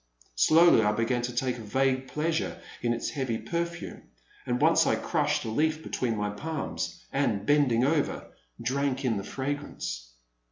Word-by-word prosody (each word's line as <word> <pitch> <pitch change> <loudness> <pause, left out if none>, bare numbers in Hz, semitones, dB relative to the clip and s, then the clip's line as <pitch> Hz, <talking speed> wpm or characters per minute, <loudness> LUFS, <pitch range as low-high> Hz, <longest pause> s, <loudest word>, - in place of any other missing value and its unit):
Slowly 160 - +6
I 105 -1 +2
began 115 +3 0
to 120 0 -4
take 125 0 -1
a - - -7
vague 130 +4 0
pleasure 155 +5 -1 0.2
in 120 - +1
its 120 - -2
heavy 130 -6 -2
perfume, 170 +3 -4 0.5
and 125 0 0
once - - +4
I - - +3
crushed - - 0
a - - -2
leaf 155 +6 0
between 115 -4 -1
my 105 0 -1
palms, 155 +8 -4
and, 115 -8 0
bending 130 -4 +3
over, 145 0 0 0.3
drank 135 +2 -1
in 115 -4 +1
the 100 - -4
frag^rance. 130 - -4
130 Hz, 160 wpm, -28 LUFS, 115-145 Hz, 0.5 s, Slowly